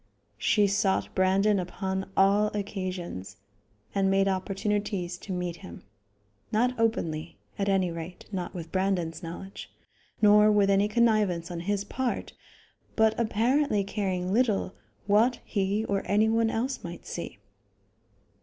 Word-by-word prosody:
She 210 -2 +3
sought 200 -1 +1
Brandon 195 +2 +3
upon 190 +2 -3
all 200 +2 +4
occasions, 185 - -5 0.6
and 195 -1 +2
made 195 0 +3
opportunities 195 -1 -1
to 200 - -8
meet 180 -2 -3
him; 85 - -11 0.7
not 245 +4 +2
openly 165 -8 -1 0.2
at 200 0 +1
any 190 -3 +2
rate, 170 +2 -8
not 185 -3 -4
with 165 -2 -7
Brandon's 185 -4 -1
knowledge, 175 +4 -8 0.5
nor 210 0 +6
with 200 -1 +4
any 200 +1 +3
connivance 210 -7 +2
on 170 - -4
his 200 +3 -1
part, 250 +4 -3 0.6
but 220 -1 +4
apparently 235 +1 +2
caring 190 -2 -2
little 215 -5 +1 0.3
what 220 +5 +3
he 200 +1 0
or 200 -2 0
any 210 +2 +3
one 225 0 +2
else 250 +5 -2
might 175 0 -8
see. - - -6
195 Hz, 130 wpm, -28 LUFS, 185-210 Hz, 0.7 s, nor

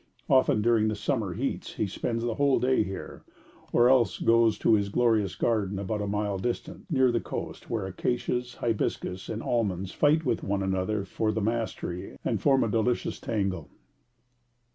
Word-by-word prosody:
Often 130 -5 +4
during 115 -2 +3
the 110 - 0
summer 110 -3 -1
heats 135 +6 -3
he - - 0
spends 115 +4 -3
the 120 -1 0
whole 140 +2 +2
day 130 +1 +2
here, 95 -2 -6 0.5
or 120 - +5
else 125 -5 +4
he - - -6
goes 115 -1 +4
to - - +3
his 100 -2 +2
glorious 110 -4 +2
garden 105 -4 0
about 100 +2 -2
a 105 - -2
mile 105 -1 -1
distant, 120 - -4
near 130 -5 +3
the 120 - +1
coast, - - -6
where 110 -4 -2
acacias, 120 +5 -2
hibiscus, 105 -4 -2
and 110 - -4
almonds 100 -6 -1
fight 155 +2 +2
with 120 -3 0
one 100 0 -1
another 95 +2 -1
for 110 +3 -1
the 110 - -2
mastery, 110 -5 -3
and - - 0
form 135 -2 +4
a - - +1
delicious 115 +3 0
tangle. 95 -8 -2
110 Hz, 175 wpm, -27 LUFS, 100-120 Hz, 0.5 s, or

